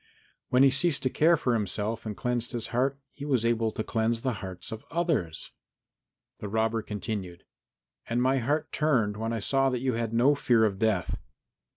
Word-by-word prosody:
When 125 Hz, +1 st, +5 dB
he 135 Hz, -, +6 dB
ceased 145 Hz, +3 st, +2 dB
to 130 Hz, -, +1 dB
care 165 Hz, +2 st, +4 dB
for 125 Hz, -4 st, 0 dB
himself 110 Hz, +1 st, -2 dB
and 105 Hz, -, -5 dB
cleansed 125 Hz, 0 st, -2 dB
his 120 Hz, -2 st, -3 dB
heart, 135 Hz, +3 st, +1 dB
he 140 Hz, -, -10 dB
was 130 Hz, -6 st, +1 dB
able 115 Hz, -1 st, +1 dB
to 110 Hz, -, -3 dB
cleanse 115 Hz, +1 st, 0 dB
the 130 Hz, -1 st, 0 dB
hearts 95 Hz, -2 st, -7 dB
of 110 Hz, 0 st, -6 dB
others. 160 Hz, -, -1 dB, 0.9 s
And -, -, -7 dB
the -, -, -4 dB
robber 110 Hz, +1 st, 0 dB
continued, 105 Hz, -4 st, -5 dB, 0.7 s
"And 120 Hz, +1 st, +1 dB
my 130 Hz, +2 st, +2 dB
heart 150 Hz, +6 st, -1 dB
turned 125 Hz, -10 st, +1 dB
when 110 Hz, +2 st, -3 dB
I 115 Hz, -, -1 dB
saw 135 Hz, +5 st, +2 dB
that 125 Hz, -2 st, -1 dB
you 130 Hz, -1 st, 0 dB
had 115 Hz, -1 st, -2 dB
no 120 Hz, +5 st, +4 dB
fear 120 Hz, -5 st, +3 dB
of 100 Hz, -3 st, -1 dB
death." 110 Hz, 0 st, 0 dB
115 Hz, 195 wpm, -28 LUFS, 110-135 Hz, 0.9 s, he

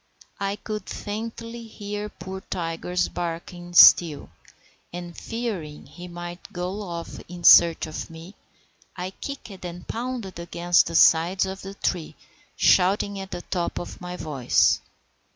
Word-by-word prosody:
I 200 Hz, 0 st, -1 dB
could 215 Hz, 0 st, -6 dB
faintly 230 Hz, +2 st, -6 dB
hear 210 Hz, -1 st, -5 dB
poor 190 Hz, -1 st, -8 dB
Tiger's 175 Hz, +1 st, -1 dB
barking 175 Hz, +1 st, -6 dB
still, 165 Hz, -4 st, +7 dB, 0.6 s
and 175 Hz, -1 st, -7 dB
fearing 205 Hz, -11 st, -5 dB
he 180 Hz, 0 st, -10 dB
might 175 Hz, 0 st, -8 dB
go 180 Hz, +4 st, -4 dB
off 170 Hz, -4 st, -6 dB
in 175 Hz, 0 st, -9 dB
search 170 Hz, 0 st, +8 dB
of 155 Hz, -1 st, -6 dB
me, 165 Hz, +4 st, -11 dB, 0.6 s
I 185 Hz, +1 st, -4 dB
kicked 210 Hz, -5 st, -8 dB
and 175 Hz, 0 st, -7 dB
pounded 230 Hz, -6 st, -4 dB
against 175 Hz, 0 st, +2 dB
the -, -, -4 dB
sides 170 Hz, +5 st, +5 dB
of 190 Hz, 0 st, -6 dB
the 195 Hz, +1 st, -8 dB
tree, 175 Hz, -5 st, -2 dB, 0.4 s
shouting 195 Hz, +2 st, +3 dB
at 195 Hz, 0 st, -7 dB
the 175 Hz, -2 st, -6 dB
top 175 Hz, -2 st, -2 dB
of 175 Hz, -, -7 dB
my 180 Hz, 0 st, -6 dB
voice. 140 Hz, -8 st, +2 dB
180 Hz, 135 wpm, -25 LUFS, 170-200 Hz, 0.6 s, search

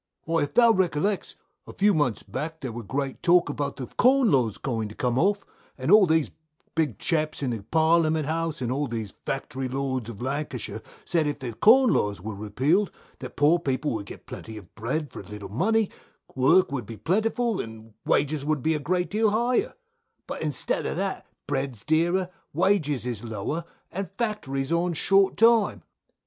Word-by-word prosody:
Jack. -, -, -42 dB
Why, 165 Hz, -1 st, +1 dB
if 145 Hz, -, -2 dB
thou 235 Hz, -1 st, +7 dB
recollects, 190 Hz, 0 st, 0 dB, 0.3 s
a -, -, -9 dB
few 205 Hz, +1 st, +3 dB
months 145 Hz, -8 st, +1 dB
back 160 Hz, +4 st, -5 dB
there 130 Hz, -3 st, -4 dB
wur 120 Hz, +1 st, -6 dB
great 135 Hz, +4 st, -3 dB
talk 175 Hz, -2 st, +4 dB
about 145 Hz, 0 st, -3 dB
the 130 Hz, -, -5 dB
Corn 255 Hz, -, +3 dB
Laws 120 Hz, -6 st, +2 dB
going 115 Hz, -5 st, -3 dB
to 105 Hz, -, -11 dB
come 125 Hz, 0 st, 0 dB
off, 200 Hz, +5 st, +1 dB, 0.3 s
and -, -, -1 dB
all 210 Hz, -3 st, +8 dB
these 160 Hz, -2 st, +2 dB, 0.4 s
big 160 Hz, -2 st, 0 dB
chaps 155 Hz, -3 st, 0 dB
in 130 Hz, -, 0 dB
the 115 Hz, -3 st, -4 dB
Parliament 160 Hz, +4 st, +2 dB
House, 160 Hz, -1 st, -2 dB
and 120 Hz, -, -1 dB
all 140 Hz, +2 st, -1 dB
these 110 Hz, -5 st, -5 dB
Factory 135 Hz, -1 st, -3 dB
Lords 130 Hz, -2 st, -2 dB
of 105 Hz, -4 st, -8 dB
Lancashire, 140 Hz, +4 st, -3 dB, 0.2 s
said 160 Hz, -3 st, +2 dB
if 145 Hz, -, -2 dB
the 125 Hz, -5 st, -5 dB
Corn 240 Hz, -, +6 dB
Laws 105 Hz, -1 st, 0 dB
wur 110 Hz, +4 st, -6 dB
repealed 130 Hz, -, +1 dB, 0.3 s
that -, -, -8 dB
poor 155 Hz, +4 st, +4 dB
people 145 Hz, -1 st, -1 dB
would 105 Hz, -3 st, -4 dB
get -, -, -10 dB
plenty 110 Hz, -1 st, -8 dB
of 105 Hz, -, -13 dB
bread 135 Hz, +7 st, -3 dB
for -, -, -8 dB
little 105 Hz, -1 st, -9 dB
money, 205 Hz, -, +1 dB, 0.4 s
work 140 Hz, +8 st, +4 dB
would 135 Hz, -4 st, -4 dB
be 115 Hz, -, -8 dB
plentiful, 220 Hz, -, 0 dB
and 110 Hz, -1 st, -11 dB
wages 145 Hz, 0 st, +1 dB
would 150 Hz, -3 st, -1 dB
be 160 Hz, -, +2 dB
a 155 Hz, -, -1 dB
great 180 Hz, +5 st, -1 dB
deal 215 Hz, +1 st, +3 dB
higher; 240 Hz, -, +1 dB, 0.5 s
but -, -, -6 dB
instead 150 Hz, -4 st, -1 dB
of -, -, -3 dB
that, 195 Hz, 0 st, -3 dB, 0.2 s
bread's 135 Hz, -5 st, -3 dB
dearer, 175 Hz, +4 st, +2 dB, 0.3 s
wages 155 Hz, -, +1 dB
is 120 Hz, -4 st, -3 dB
lower, 115 Hz, +9 st, -4 dB, 0.3 s
and 195 Hz, +3 st, -4 dB
factories 140 Hz, -, -2 dB
are 170 Hz, -, +3 dB
on 175 Hz, 0 st, 0 dB
short 195 Hz, +4 st, +3 dB
time. 225 Hz, -2 st, +4 dB
150 Hz, 185 wpm, -26 LUFS, 130-185 Hz, 0.5 s, all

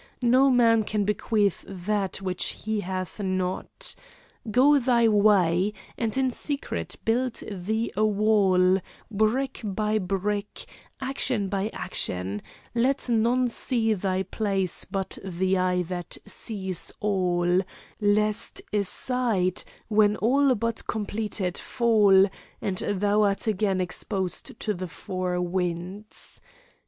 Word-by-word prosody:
No 255 Hz, +3 st, +5 dB
man 230 Hz, -3 st, +4 dB
can 210 Hz, 0 st, -1 dB
bequeath 210 Hz, -1 st, +1 dB
that 195 Hz, +1 st, -2 dB
which 185 Hz, -2 st, -2 dB
he 220 Hz, -1 st, 0 dB
hath 185 Hz, 0 st, -4 dB
not. 185 Hz, -, -3 dB, 0.6 s
Go 275 Hz, +6 st, +5 dB
thy 240 Hz, -2 st, +3 dB
way, 200 Hz, -3 st, +4 dB, 0.2 s
and 230 Hz, 0 st, -2 dB
in 260 Hz, -1 st, +2 dB
secret 285 Hz, +3 st, -3 dB
build 240 Hz, +2 st, +1 dB, 0.2 s
thee 215 Hz, +4 st, -2 dB
a 215 Hz, -, +2 dB
wall, 200 Hz, -3 st, +4 dB, 0.3 s
brick 220 Hz, +6 st, 0 dB
by 215 Hz, +1 st, 0 dB
brick, 200 Hz, +2 st, -2 dB, 0.3 s
action 260 Hz, -6 st, -1 dB
by 200 Hz, +1 st, -1 dB
action; 100 Hz, -, -2 dB, 0.3 s
let 255 Hz, +3 st, +1 dB
none 240 Hz, +2 st, +3 dB
see 230 Hz, -2 st, 0 dB
thy 190 Hz, -1 st, -1 dB
place 195 Hz, -4 st, -1 dB
but 190 Hz, -1 st, -3 dB
the 190 Hz, 0 st, 0 dB
eye 180 Hz, 0 st, +1 dB
that 175 Hz, 0 st, -5 dB
seeth 190 Hz, -5 st, -5 dB
all, 180 Hz, -3 st, +2 dB, 0.4 s
lest 210 Hz, 0 st, +1 dB
a 205 Hz, -1 st, +2 dB
side, 205 Hz, -4 st, 0 dB, 0.3 s
when 210 Hz, -1 st, +4 dB
all 265 Hz, +4 st, +3 dB
but 230 Hz, +1 st, -3 dB
completed, 205 Hz, -3 st, -2 dB
fall, 210 Hz, -5 st, +4 dB, 0.3 s
and 190 Hz, -2 st, -2 dB
thou 205 Hz, +1 st, +1 dB
art 200 Hz, +1 st, +1 dB
again 200 Hz, -3 st, +1 dB
exposed 185 Hz, +3 st, -3 dB
to 215 Hz, -, 0 dB
the 185 Hz, -1 st, -5 dB
four 180 Hz, 0 st, -3 dB
winds. 180 Hz, +3 st, -4 dB
205 Hz, 120 wpm, -26 LUFS, 185-225 Hz, 0.6 s, No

